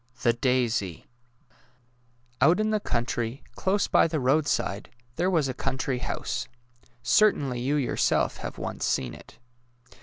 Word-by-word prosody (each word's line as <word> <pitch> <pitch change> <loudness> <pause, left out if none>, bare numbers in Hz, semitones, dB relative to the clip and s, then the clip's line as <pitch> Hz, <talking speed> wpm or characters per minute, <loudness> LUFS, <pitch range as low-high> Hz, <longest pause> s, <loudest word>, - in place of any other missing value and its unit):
THE 120 - +4
DAISY 120 -7 0 1.4
Out 175 +5 +5
in 215 0 +1
the 215 - +2
country, 120 - -2
close 195 +2 0
by - - +4
the 160 -1 -1
roadside, 130 -6 0 0.3
there 180 +3 +1
was 160 -7 +2
a 130 - -2
country 130 0 -2
house. - - -3 0.6
Certainly 135 - +3
you 135 +4 0
yourself 140 -4 +1
have - - -6
once - - -5
seen 65 -2 0
it. - - -14
130 Hz, 130 wpm, -27 LUFS, 120-160 Hz, 1.4 s, Out